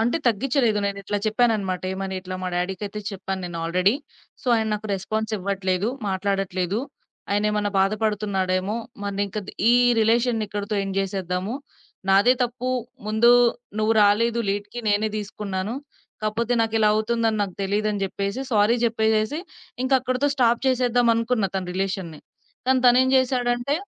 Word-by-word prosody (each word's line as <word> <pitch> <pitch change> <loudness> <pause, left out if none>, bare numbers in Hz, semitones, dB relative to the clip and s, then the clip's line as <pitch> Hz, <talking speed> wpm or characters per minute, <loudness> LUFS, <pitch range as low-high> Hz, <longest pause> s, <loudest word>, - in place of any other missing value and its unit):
అంటే 235 +5 +2
తగ్గించలేదు. 240 -1 +2
నేనిట్లా 200 +1 -2
చెప్పాననమాట. 215 -5 +1
ఏమనిట్లా 190 -1 -4
మా 185 - -1
డ్యాడీ‌కయితే 190 +4 -3
చెప్పాను 190 0 -4
నేను 170 -1 -6
ఆల్రెడీ. 185 +5 +2 0.5
సో - - -17
ఆయన 220 - 0
నాకు 215 +1 -5
రెస్‌పాన్సివ్వట్లేదు, 200 -1 -1 0.2
మాట్లాడట్లేదు. 195 0 -1 0.5
ఆయనేమన్న 210 0 +1
బాధపడుతున్నాడేమో 200 -1 0 0.3
మరింకా 200 0 -2 0.3
ఈ - - +6 0.3
రిలేషన్‌ని 230 0 +2
ఇక్కడితో 205 +1 -3
ఎండ్ 195 0 -4
జేసేద్దాము. 190 +1 -2 0.5
నాదే 200 +6 +6
తప్పు 245 +1 -4 0.4
ముందు 220 +3 +4 0.5
నువ్వు 215 +1 +2
రాలేదు 225 +3 +3
లీడ్‌కి 205 +3 -3
నేనే 210 +1 +2
దీసుకున్నాను. 205 0 -4 0.5
కాపోతే 230 +3 0
నాకిలా 225 -1 +2
అవుతుందని 225 0 +1
నాకు 190 -3 -4
తెలీదని 205 +1 0
జెప్పేసి 200 +4 -2
సోరీ 215 +1 +4
జెప్పేసేసి 220 +2 +1 0.4
ఇంక 260 +1 -1
అక్కడితో 255 +2 0
స్టాప్ 240 -3 +3
చేసేద్దామనుకున్న 245 -2 +2
తన 190 -1 -1
రిలేషన్‌ని. 185 -5 -3 0.5
కానీ 260 0 +3
తనేం 255 +2 +5
జేసాడంటే 250 +1 +1
210 Hz, 120 wpm, -24 LUFS, 195-230 Hz, 0.5 s, ఈ